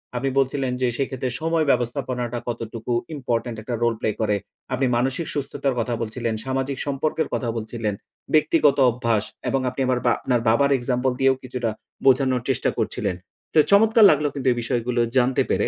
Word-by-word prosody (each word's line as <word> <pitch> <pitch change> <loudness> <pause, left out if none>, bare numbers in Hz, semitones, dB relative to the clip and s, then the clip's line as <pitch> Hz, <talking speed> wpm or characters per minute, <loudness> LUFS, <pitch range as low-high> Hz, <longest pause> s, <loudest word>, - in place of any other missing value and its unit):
আপনি 135 +2 0
বলছিলেন 135 -1 0
যে 125 - +3
সেক্ষেত্রে 130 -2 -2
সময় 165 -1 +1
ব্যবস্থাপনাটা 120 0 -2
কতটুকু 115 0 -5 0.2
ইম্পোর্টেন্ট 120 -3 -2
একটা 120 +2 -3
রোল 115 -1 +3
প্লে - - 0
করে। 105 -1 +2 0.4
আপনি 130 +1 +1
মানসিক 135 +6 -1
সুস্থতার 140 -2 -2
কথা 120 +1 -1
বলছিলেন, 115 +1 -2
সামাজিক 135 +1 -2
সম্পর্কের 145 +3 -1
কথা 120 - -1
বলছিলেন। 110 -1 -3 0.4
ব্যক্তিগত 155 -1 +4
অভ্যাস 115 -3 0 0.3
এবং 135 - +1
আপনি 130 +2 -5 0.2
বা 120 - +5
আপনার 120 -3 0
বাবার 140 +5 +3
এক্সাম্পল 125 +1 0
দিয়েও 135 0 +4
কিছুটা 125 -2 -3 0.4
বোঝানোর 130 -2 +4
চেষ্টা 130 - +1
করছিলেন। 90 - -1 0.4
তো 155 - +7
চমৎকার 220 +2 +6
লাগলো 150 0 +1
কিন্তু 135 -2 -3
এই 120 - -1
বিষয়গুলো 120 0 0 0.2
জানতে 125 +1 +3
পেরে - - +1
125 Hz, 160 wpm, -23 LUFS, 120-135 Hz, 0.4 s, তো